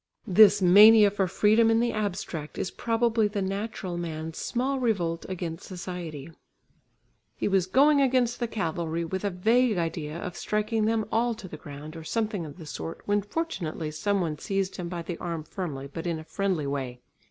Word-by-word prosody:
This 205 Hz, -1 st, +6 dB
mania 205 Hz, +3 st, +8 dB
for 195 Hz, -2 st, 0 dB
freedom 215 Hz, +5 st, +4 dB
in 225 Hz, 0 st, +4 dB
the 235 Hz, 0 st, +1 dB
abstract 180 Hz, -7 st, -4 dB
is -, -, -2 dB
probably 230 Hz, -1 st, +1 dB
the 205 Hz, 0 st, -3 dB
natural 195 Hz, -2 st, -4 dB
man's 160 Hz, -1 st, -5 dB
small 265 Hz, +3 st, -1 dB
revolt 175 Hz, -9 st, -1 dB
against 170 Hz, -2 st, -5 dB
society. 175 Hz, -5 st, -6 dB, 1.0 s
He -, -, -1 dB
was 190 Hz, -3 st, +2 dB
going 280 Hz, +7 st, +5 dB
against 250 Hz, -3 st, +2 dB
the 240 Hz, -, -1 dB
cavalry 170 Hz, -5 st, -2 dB
with 190 Hz, +4 st, -4 dB
a 205 Hz, -, +1 dB
vague 220 Hz, +4 st, +2 dB
idea 165 Hz, -2 st, -3 dB
of 175 Hz, 0 st, -6 dB
striking 215 Hz, +1 st, -1 dB
them 220 Hz, -1 st, +1 dB
all 235 Hz, +1 st, +1 dB
to 215 Hz, -4 st, -9 dB
the 165 Hz, -, -8 dB
ground 150 Hz, +1 st, -9 dB
or 165 Hz, -, -8 dB
something 210 Hz, -2 st, -2 dB
of 145 Hz, -, -11 dB
the 165 Hz, -, -10 dB
sort, 80 Hz, -, -6 dB
when 205 Hz, 0 st, +2 dB
fortunately 195 Hz, -, -3 dB
some 200 Hz, +5 st, 0 dB
one 155 Hz, -4 st, -2 dB
seized 195 Hz, +1 st, -2 dB
him 175 Hz, -2 st, -4 dB
by 170 Hz, -1 st, -4 dB
the 170 Hz, 0 st, -6 dB
arm 170 Hz, -3 st, -4 dB
firmly 155 Hz, -5 st, -5 dB
but 165 Hz, +2 st, -4 dB
in 170 Hz, -2 st, -1 dB
a 155 Hz, -, -8 dB
friendly 185 Hz, -3 st, -1 dB
way. 135 Hz, -3 st, -3 dB
190 Hz, 185 wpm, -27 LUFS, 165-220 Hz, 1.0 s, mania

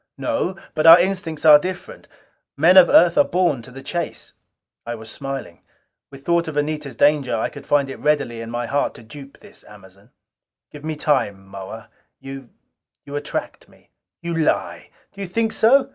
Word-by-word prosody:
"No. 285 Hz, -, -2 dB, 0.2 s
But 155 Hz, +1 st, +1 dB
our 165 Hz, +1 st, +10 dB
instincts 175 Hz, -4 st, -2 dB
are 150 Hz, -1 st, +9 dB
different. 185 Hz, +2 st, -7 dB, 0.5 s
Men 170 Hz, +6 st, +5 dB
of 185 Hz, -3 st, +8 dB
Earth 170 Hz, 0 st, +5 dB
are -, -, +7 dB
born 175 Hz, -8 st, 0 dB
to 120 Hz, -, -13 dB
the 135 Hz, +2 st, -11 dB
chase." 175 Hz, -1 st, -5 dB, 0.5 s
I 120 Hz, 0 st, -5 dB
was 110 Hz, 0 st, -10 dB
smiling. 135 Hz, -11 st, -7 dB, 0.5 s
With 135 Hz, 0 st, -14 dB
thought 170 Hz, 0 st, +1 dB
of 155 Hz, -2 st, -5 dB
Anita's 145 Hz, -3 st, -3 dB
danger 145 Hz, -2 st, +2 dB
I 110 Hz, -, -1 dB
could 145 Hz, -1 st, -12 dB
find 145 Hz, -1 st, +2 dB
it 135 Hz, -, -8 dB
readily 145 Hz, -6 st, 0 dB
in 115 Hz, -, -7 dB
my 120 Hz, +1 st, -3 dB
heart 140 Hz, +4 st, -1 dB
to 115 Hz, -, -13 dB
dupe 135 Hz, +5 st, -13 dB
this 205 Hz, -, -16 dB
Amazon. 100 Hz, 0 st, -17 dB, 0.6 s
"Give 150 Hz, -1 st, -12 dB
me 155 Hz, 0 st, -4 dB
time, 100 Hz, -10 st, -1 dB
Moa. 100 Hz, +4 st, -10 dB, 0.3 s
You 135 Hz, -2 st, -10 dB, 0.6 s
attract 145 Hz, +1 st, -6 dB
me." -, -, -25 dB, 0.3 s
"You 170 Hz, 0 st, -3 dB
lie!" 160 Hz, -2 st, -1 dB, 0.2 s
"Do 200 Hz, -, -10 dB
you 195 Hz, -, -4 dB
think 225 Hz, +5 st, -1 dB
so?" 265 Hz, +6 st, +4 dB
145 Hz, 175 wpm, -21 LUFS, 120-170 Hz, 0.6 s, our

